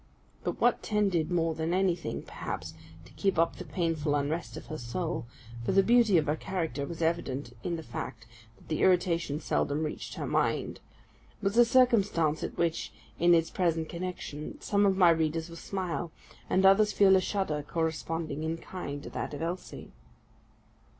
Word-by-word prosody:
But -, -, -3 dB
what 245 Hz, 0 st, +3 dB
tended 195 Hz, -7 st, +1 dB
more 165 Hz, -2 st, +1 dB
than 160 Hz, +2 st, -1 dB
anything, 185 Hz, -3 st, 0 dB
perhaps, -, -, -6 dB, 0.3 s
to -, -, -16 dB
keep 195 Hz, -3 st, 0 dB
up 165 Hz, +1 st, +2 dB
the -, -, -6 dB
painful 165 Hz, -4 st, -1 dB
unrest 145 Hz, +4 st, -2 dB
of -, -, -8 dB
her 155 Hz, -, -6 dB
soul 140 Hz, +2 st, -3 dB, 0.4 s
(for -, -, 0 dB
the 195 Hz, -, +5 dB
beauty 230 Hz, -5 st, +5 dB
of 155 Hz, -, +2 dB
her 150 Hz, -, +1 dB
character 165 Hz, -6 st, -3 dB
was 170 Hz, -1 st, -4 dB
evident 140 Hz, -6 st, -1 dB
in 175 Hz, -, -1 dB
the 160 Hz, -, -6 dB
fact 115 Hz, -2 st, -6 dB, 0.3 s
that -, -, -21 dB
the 155 Hz, -, -1 dB
irritation 170 Hz, -5 st, +2 dB
seldom 150 Hz, -1 st, 0 dB
reached 155 Hz, -, -5 dB
her -, -, -4 dB
mind), -, -, 0 dB, 0.6 s
was 200 Hz, +1 st, -1 dB
a 240 Hz, -, +8 dB
circumstance 210 Hz, -, +3 dB
at -, -, -5 dB
which, 170 Hz, -1 st, 0 dB, 0.3 s
in 175 Hz, 0 st, +6 dB
its 165 Hz, 0 st, +1 dB
present 165 Hz, -3 st, 0 dB
connection, 170 Hz, -4 st, -6 dB
some 200 Hz, 0 st, +2 dB
of 190 Hz, -1 st, +2 dB
my 180 Hz, -3 st, +7 dB
readers 160 Hz, 0 st, 0 dB
will 170 Hz, -, -9 dB
smile, 175 Hz, -2 st, -3 dB, 0.4 s
and 190 Hz, +1 st, +3 dB
others 210 Hz, +2 st, +6 dB
feel 195 Hz, -2 st, +6 dB
a 190 Hz, -, +4 dB
shudder 185 Hz, -6 st, -1 dB
corresponding 160 Hz, -1 st, -2 dB
in 160 Hz, +1 st, -1 dB
kind 145 Hz, -5 st, -6 dB
to -, -, -7 dB
that -, -, -4 dB
of 145 Hz, -, -5 dB
Elsie. 175 Hz, +2 st, -5 dB
170 Hz, 175 wpm, -29 LUFS, 155-190 Hz, 0.6 s, a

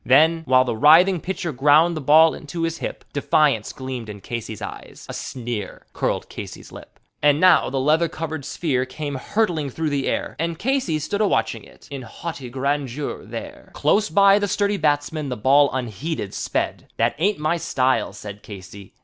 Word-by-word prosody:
Then, 160 Hz, +5 st, +4 dB
while 130 Hz, -1 st, +4 dB
the 120 Hz, -, -2 dB
writhing 165 Hz, -, +6 dB
pitcher 180 Hz, -3 st, -3 dB
ground 150 Hz, +5 st, +4 dB
the 155 Hz, -, -4 dB
ball 155 Hz, +4 st, +6 dB
into 165 Hz, +2 st, -6 dB
his 165 Hz, 0 st, -2 dB
hip, -, -, -6 dB
Defiance 145 Hz, -5 st, +2 dB
gleamed 130 Hz, -4 st, -6 dB
in 105 Hz, -1 st, -8 dB
Casey's 110 Hz, 0 st, -6 dB
eye, -, -, -8 dB
a -, -, -7 dB
sneer 120 Hz, -5 st, -6 dB
curled -, -, -2 dB
Casey's -, -, -9 dB
lip. -, -, -13 dB, 0.2 s
And 145 Hz, 0 st, +4 dB
now 185 Hz, 0 st, +5 dB
the 135 Hz, -, -2 dB
leather 155 Hz, +5 st, +2 dB
covered 160 Hz, -2 st, -5 dB
sphere 130 Hz, -4 st, -1 dB
came 145 Hz, +2 st, -5 dB
hurtling 160 Hz, +1 st, -1 dB
through 155 Hz, +3 st, -3 dB
the 140 Hz, -2 st, -1 dB
air, -, -, -2 dB
And 165 Hz, 0 st, -2 dB
Casey 250 Hz, -, 0 dB
stood 155 Hz, +8 st, -2 dB
a 210 Hz, -, +4 dB
watching -, -, 0 dB
it -, -, -17 dB
in 140 Hz, -2 st, -5 dB
haughty 130 Hz, +2 st, -7 dB
grandeur 140 Hz, +1 st, -3 dB
there, -, -, -9 dB
Close 215 Hz, +1 st, +2 dB
by 200 Hz, 0 st, +5 dB
the 205 Hz, -, 0 dB
sturdy 200 Hz, +1 st, 0 dB
batsman 150 Hz, -2 st, 0 dB
the 125 Hz, -, -3 dB
ball 140 Hz, +6 st, +4 dB
unheeded 125 Hz, -, -4 dB
sped -, -, -3 dB
"That 115 Hz, +1 st, +2 dB
ain't 200 Hz, +5 st, +2 dB
my 155 Hz, +3 st, 0 dB
style," 130 Hz, -5 st, 0 dB
said 105 Hz, -1 st, -9 dB
Casey. 100 Hz, 0 st, -11 dB
145 Hz, 180 wpm, -22 LUFS, 130-165 Hz, 0.2 s, writhing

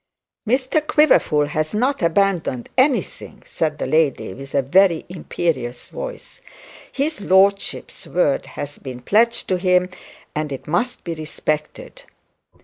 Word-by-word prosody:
'Mr 260 Hz, +5 st, +1 dB
Quiverful 215 Hz, -, +4 dB
has 155 Hz, +4 st, -2 dB
not 260 Hz, +6 st, +1 dB
abandoned 170 Hz, -7 st, +1 dB
anything,' 260 Hz, +1 st, 0 dB
said 155 Hz, -2 st, -2 dB
the -, -, -3 dB
lady, 155 Hz, -11 st, +1 dB
with 135 Hz, +4 st, -9 dB
a 140 Hz, -, +3 dB
very 175 Hz, +4 st, +3 dB
imperious 140 Hz, -8 st, -3 dB
voice. -, -, -8 dB, 0.5 s
'His 285 Hz, -3 st, -2 dB
lordship's 195 Hz, -1 st, +1 dB
word 165 Hz, -5 st, +1 dB
has 145 Hz, 0 st, -6 dB
been 130 Hz, -3 st, -8 dB
pledged 235 Hz, -, +2 dB
to 185 Hz, -1 st, +1 dB
him, 180 Hz, 0 st, +3 dB, 0.4 s
and 150 Hz, -1 st, -3 dB
it 135 Hz, -, -6 dB
must 205 Hz, +11 st, -1 dB
be 170 Hz, -, -3 dB
respected.' 155 Hz, -, -4 dB
175 Hz, 130 wpm, -21 LUFS, 150-220 Hz, 0.5 s, Quiverful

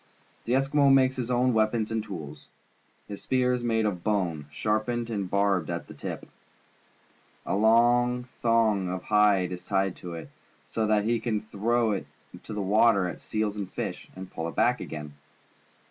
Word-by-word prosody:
The 120 Hz, -, 0 dB
Eskimo 135 Hz, +1 st, +3 dB
makes 130 Hz, -1 st, +4 dB
his 125 Hz, -2 st, -3 dB
own 125 Hz, 0 st, +2 dB
weapons 110 Hz, 0 st, +1 dB
and 110 Hz, -1 st, -1 dB
tools. 80 Hz, -9 st, -8 dB, 0.6 s
His 100 Hz, -1 st, -7 dB
spear 125 Hz, -1 st, +1 dB
is 125 Hz, -1 st, -2 dB
made 115 Hz, -2 st, +1 dB
of 90 Hz, -5 st, -2 dB
bone, 90 Hz, -9 st, -1 dB
sharpened 110 Hz, +6 st, -1 dB
and 100 Hz, -4 st, -2 dB
barbed 100 Hz, -4 st, +1 dB
at 85 Hz, 0 st, -3 dB
the -, -, -11 dB
tip. -, -, -6 dB, 1.2 s
A -, -, -1 dB
long 120 Hz, +3 st, +4 dB, 0.2 s
thong 110 Hz, -5 st, +2 dB
of 90 Hz, 0 st, -4 dB
liide 105 Hz, -4 st, +3 dB
is 90 Hz, 0 st, -6 dB
tied 95 Hz, -1 st, 0 dB
to 85 Hz, -2 st, -7 dB
it, 80 Hz, -, -9 dB, 0.3 s
so 110 Hz, -1 st, -1 dB
that 105 Hz, -1 st, +3 dB
he 115 Hz, +2 st, +1 dB
can 110 Hz, -3 st, -1 dB
throw 110 Hz, +2 st, 0 dB
it 100 Hz, -, -3 dB, 0.3 s
into -, -, -11 dB
the 105 Hz, -1 st, -2 dB
water 100 Hz, 0 st, +4 dB
at 90 Hz, -, -5 dB
seals 110 Hz, -1 st, -2 dB
and 100 Hz, -3 st, -5 dB
fish, -, -, -5 dB
and 95 Hz, 0 st, -9 dB
pull 80 Hz, 0 st, -4 dB
it 85 Hz, -, -7 dB
back 125 Hz, +1 st, +2 dB
again. 75 Hz, -2 st, -7 dB
110 Hz, 175 wpm, -27 LUFS, 95-120 Hz, 1.2 s, makes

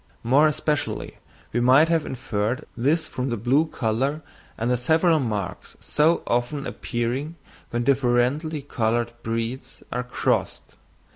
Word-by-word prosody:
More 140 Hz, +6 st, +5 dB
especially 150 Hz, 0 st, -2 dB, 0.4 s
we 120 Hz, -, +1 dB
might 130 Hz, +6 st, +6 dB
have 165 Hz, -2 st, +1 dB
inferred 115 Hz, -1 st, -2 dB
this 150 Hz, +7 st, +1 dB
from 130 Hz, +1 st, -3 dB
the 120 Hz, -, -1 dB
blue 130 Hz, +9 st, +2 dB
colour 135 Hz, +4 st, -1 dB, 0.3 s
and 115 Hz, +2 st, 0 dB
the -, -, +4 dB
several 160 Hz, +6 st, +3 dB
marks 105 Hz, -8 st, -4 dB
so 160 Hz, +3 st, +2 dB
often 120 Hz, +4 st, -1 dB
appearing 125 Hz, +7 st, -3 dB, 0.3 s
when 120 Hz, 0 st, -1 dB
differently 140 Hz, +4 st, +1 dB
coloured 120 Hz, -3 st, 0 dB
breeds 115 Hz, +3 st, -4 dB
are 125 Hz, -, -1 dB
crossed. 125 Hz, -, -1 dB
125 Hz, 130 wpm, -24 LUFS, 120-150 Hz, 0.4 s, might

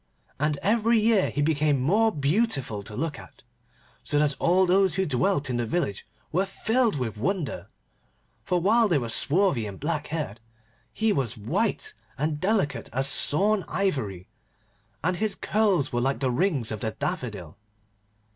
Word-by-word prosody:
And 150 Hz, 0 st, 0 dB
every 225 Hz, +2 st, +3 dB
year 215 Hz, -3 st, +3 dB
he 145 Hz, -, -1 dB
became 150 Hz, -2 st, +1 dB
more 210 Hz, -, +2 dB
beautiful 145 Hz, -, 0 dB
to 105 Hz, +1 st, -7 dB
look 150 Hz, +3 st, -3 dB
at, -, -, -15 dB, 0.6 s
so 145 Hz, -, -1 dB
that 150 Hz, -1 st, +2 dB
all 185 Hz, +2 st, +3 dB
those 185 Hz, -1 st, +3 dB
who 190 Hz, +1 st, +1 dB
dwelt 145 Hz, +2 st, 0 dB
in 125 Hz, -2 st, -2 dB
the 120 Hz, -, -1 dB
village 110 Hz, -, -2 dB, 0.2 s
were 185 Hz, +4 st, 0 dB
filled 225 Hz, +3 st, 0 dB
with 115 Hz, -6 st, -3 dB
wonder, 140 Hz, -, -2 dB, 0.8 s
for, 180 Hz, -, 0 dB
while 220 Hz, +6 st, +3 dB
they 170 Hz, -6 st, +2 dB
were 120 Hz, -4 st, -3 dB
swarthy 145 Hz, -, +1 dB
and 100 Hz, -2 st, -9 dB
black 150 Hz, 0 st, -2 dB
haired, 145 Hz, -9 st, -4 dB, 0.5 s
he 220 Hz, -1 st, +1 dB
was 120 Hz, -5 st, -1 dB
white 105 Hz, 0 st, -2 dB, 0.2 s
and 150 Hz, +1 st, -2 dB
delicate 185 Hz, -, 0 dB
as 135 Hz, +3 st, +2 dB
sawn 195 Hz, +8 st, +4 dB
ivory, 130 Hz, -, -2 dB, 0.8 s
and 180 Hz, +2 st, 0 dB
his 215 Hz, -1 st, 0 dB
curls 200 Hz, -, +1 dB
were 120 Hz, -, 0 dB
like 135 Hz, -1 st, 0 dB
the 130 Hz, -2 st, 0 dB
rings 135 Hz, -, 0 dB
of 110 Hz, -, -4 dB
the 110 Hz, -, -2 dB
daffodil. 125 Hz, -, -5 dB
150 Hz, 160 wpm, -26 LUFS, 125-195 Hz, 0.8 s, sawn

